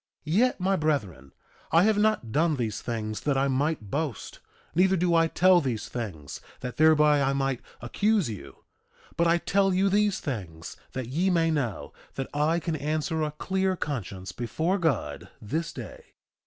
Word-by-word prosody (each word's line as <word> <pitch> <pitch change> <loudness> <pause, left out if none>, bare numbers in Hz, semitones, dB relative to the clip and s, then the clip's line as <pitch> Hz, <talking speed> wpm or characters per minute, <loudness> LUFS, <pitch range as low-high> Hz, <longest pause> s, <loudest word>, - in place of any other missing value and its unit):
2:15 155 +2 -1
Yet, 250 0 +3
my 190 +2 +2
brethren, 105 - -2 0.4
I 165 +2 +5
have 215 0 +3
not 215 - +1
done 155 +4 +2
these 115 -6 -3
things 110 -3 -3
that 145 -2 0
I 135 +1 +2
might 135 -5 -1
boast, 145 -8 -3 0.3
neither 190 +3 +3
do 175 0 +1
I 165 0 +4
tell 180 +1 +4
these 115 -6 -3
things 95 - -6 0.2
that 125 -1 -6
thereby 150 -2 +5
I 135 0 +2
might 135 -2 -1 0.2
accuse 200 - +1
you; 90 - -9 0.5
but 170 0 +2
I 170 +1 +4
tell 195 +3 +2
you 190 +2 +2
these 205 0 +2
things 90 - -6 0.2
that 130 -2 -4
ye 170 +8 +1
may 165 -2 +2
know 130 -10 -2 0.2
that 135 - -4
I 150 +3 +2
can 165 -1 -2
answer 155 +2 -1
a 155 - 0
clear 190 +5 -1
conscience 100 - -5
before 160 - -1
God 135 - -1
this 160 +10 -3
day. - - -9
150 Hz, 170 wpm, -27 LUFS, 120-175 Hz, 0.5 s, I